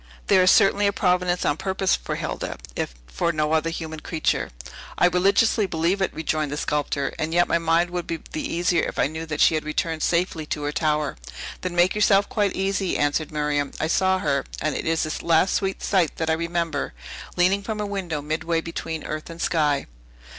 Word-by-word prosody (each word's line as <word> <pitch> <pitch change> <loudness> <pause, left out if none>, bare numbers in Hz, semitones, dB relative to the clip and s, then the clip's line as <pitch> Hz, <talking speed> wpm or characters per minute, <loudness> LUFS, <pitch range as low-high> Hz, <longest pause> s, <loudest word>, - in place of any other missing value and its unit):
There 190 -2 +5
is 185 - +5
certainly 200 +1 +5
a - - +3
providence 180 -1 +1
on 145 - +1
purpose 190 0 +1
for - - -4
Hilda, - - -4 0.2
if - - -3
for 60 - -1
no 155 -1 0
other 160 +1 +2
human 160 -1 -5
creature." 160 0 -1 0.5
"I - - +4
religiously 195 +4 +3
believe 170 +3 0
it," 190 - +1
rejoined 155 -2 -2
the 145 - -3
sculptor; 145 -2 -1
"and 160 +2 -1
yet 175 0 +4
my 170 - +2
mind 165 +1 +2
would 175 -1 -3
be 165 - -2
the 310 - -3
easier, 175 - +1
if - - -6
I - - +3
knew 160 +3 -5
that 155 -2 -4
she - - +6
had 155 - 0
returned 155 +1 -2
safely 170 -2 0
to 150 - -3
her 145 - -1
tower." 150 -1 0 0.4
"Then 180 -1 -3
make 175 +2 +4
yourself 205 -1 +4
quite 205 -3 0
easy," 195 0 0
answered 145 +2 0
Miriam. 150 -1 -1
"I - - 0
saw 190 +3 +2
her 140 -6 0 0.2
(and 155 0 -1
it - - -3
is 165 0 +1
the 155 - -4
last 170 +3 +3
sweet 195 -1 -1
sight 185 -6 +2
that 160 -1 -1
I - - +4
remember) 170 - -2 0.4
leaning 185 +3 +3
from 215 +1 -4
her 210 - -2
window 180 -7 -3
midway 160 +2 -1
between 165 -1 -5
earth 155 +1 -5
and 165 0 -9
sky!" 150 -5 +1
165 Hz, 205 wpm, -24 LUFS, 155-185 Hz, 0.5 s, she